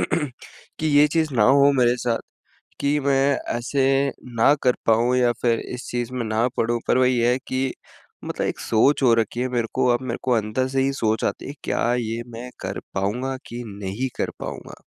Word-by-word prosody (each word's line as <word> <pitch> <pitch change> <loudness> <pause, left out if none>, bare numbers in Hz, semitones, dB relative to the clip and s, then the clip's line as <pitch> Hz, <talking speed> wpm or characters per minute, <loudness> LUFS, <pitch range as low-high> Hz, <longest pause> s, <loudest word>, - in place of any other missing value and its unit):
कि 150 +1 -4
ये 145 0 +5
चीज़ 155 -2 0
ना 115 - +3
हो 140 +3 +6
मेरे 125 -2 +3
साथ 120 -2 -1 0.6
कि 145 +1 +2
मैं 140 0 +2 0.2
ऐसे 130 +3 0 0.5
ना 115 +5 +6
कर 125 -1 +3
पाऊँ 115 +3 +3
या 125 -1 +3
फ़िर 115 -2 +2
इस 125 +1 -7
चीज़ 120 0 -2
में 125 -2 -2
ना 110 +2 +1
पडूँ 120 +1 +1
पर - - +3
वही 125 -1 +3
है 120 +2 +3
कि 130 0 -1 0.5
मतलब - - -2
एक - - -4
सोच 135 +6 +2
हो 120 -3 +6
रखी 115 +1 -1
है 130 - 0
मेरे 120 -2 -1
को - - +1
अब 120 - -1
मेरे 130 - -3
को 130 - 0
अंदर 115 +3 0
से 135 0 +1
ही 135 - +2
सोच 110 -4 0
आती - - -3
है 140 - -6
क्या 120 - +1
ये 115 -1 -2
मैं 120 +2 -7
कर - - -4 0.2
पाऊँगा 120 +8 -1
कि 120 +1 -6
नहीं 100 +4 -4
कर - - -1
पाऊँगा? - - -7
125 Hz, 200 wpm, -23 LUFS, 115-135 Hz, 0.6 s, हो